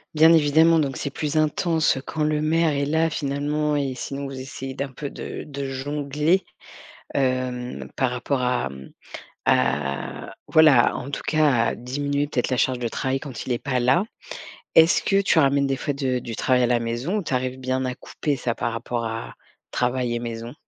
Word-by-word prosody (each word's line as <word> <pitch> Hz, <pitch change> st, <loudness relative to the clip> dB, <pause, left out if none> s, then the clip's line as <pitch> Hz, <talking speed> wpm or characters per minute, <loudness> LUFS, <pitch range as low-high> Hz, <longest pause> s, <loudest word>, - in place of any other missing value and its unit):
Bien 160 Hz, +2 st, +7 dB
évidemment 160 Hz, +1 st, +5 dB
donc 140 Hz, -4 st, 0 dB
c'est 140 Hz, -, -3 dB
plus 150 Hz, +2 st, -3 dB
intense, 155 Hz, 0 st, +2 dB
heu, -, -, -4 dB
quand 155 Hz, -, -2 dB
le 150 Hz, 0 st, +1 dB
maire 160 Hz, +1 st, +2 dB
est 140 Hz, -1 st, 0 dB
là 160 Hz, +3 st, +2 dB
finalement 150 Hz, 0 st, -1 dB
et 140 Hz, -3 st, -1 dB
sinon 140 Hz, +2 st, -5 dB
vous 135 Hz, -1 st, -7 dB
essayez 135 Hz, 0 st, -7 dB
d'un 140 Hz, -1 st, -4 dB
peu 140 Hz, +2 st, -6 dB
de -, -, -7 dB
de 140 Hz, -1 st, -5 dB
jongler, 145 Hz, +6 st, 0 dB, 0.7 s
hem, 130 Hz, -2 st, -1 dB
par 130 Hz, -2 st, +1 dB
rapport 125 Hz, +2 st, -1 dB
à, 125 Hz, -, +1 dB
hem, 65 Hz, -1 st, -11 dB, 0.5 s
à 70 Hz, -2 st, 0 dB
voilà, 150 Hz, -6 st, +5 dB
en 135 Hz, -, -6 dB
tout 140 Hz, -, -3 dB
cas 155 Hz, -2 st, +4 dB, 0.2 s
à -, -, -1 dB
diminuer 140 Hz, +3 st, -2 dB
peut-être 130 Hz, -4 st, -1 dB
la 130 Hz, -, 0 dB
charge 130 Hz, 0 st, +1 dB
de 120 Hz, -1 st, -2 dB
travail 135 Hz, +3 st, -2 dB
quand 135 Hz, -4 st, -7 dB
il -, -, -2 dB
est 120 Hz, -, 0 dB
pas 130 Hz, -1 st, -1 dB
là. 130 Hz, +10 st, +3 dB, 0.7 s
Est-ce 165 Hz, +2 st, +6 dB
que 195 Hz, 0 st, +2 dB
tu 185 Hz, -4 st, +3 dB
ramènes 140 Hz, -1 st, +3 dB
des 135 Hz, 0 st, 0 dB
fois 140 Hz, +2 st, -3 dB
de 130 Hz, -3 st, 0 dB
du 115 Hz, -2 st, -6 dB
travail 125 Hz, +2 st, +2 dB
à 125 Hz, -, +3 dB
la 120 Hz, 0 st, +2 dB
maison? 120 Hz, -, -2 dB
Ou 205 Hz, -, -2 dB
tu 150 Hz, -, -4 dB
arrives 130 Hz, 0 st, -1 dB
bien 130 Hz, 0 st, -1 dB
à 125 Hz, 0 st, -3 dB
couper 145 Hz, +3 st, -3 dB
ça 125 Hz, -2 st, -2 dB
par 115 Hz, -, -2 dB
rapport 115 Hz, 0 st, -3 dB
à 115 Hz, 0 st, -5 dB, 0.4 s
travail 125 Hz, -1 st, 0 dB
et 120 Hz, -, -1 dB
maison? 115 Hz, 0 st, -6 dB
135 Hz, 200 wpm, -24 LUFS, 125-150 Hz, 0.7 s, Bien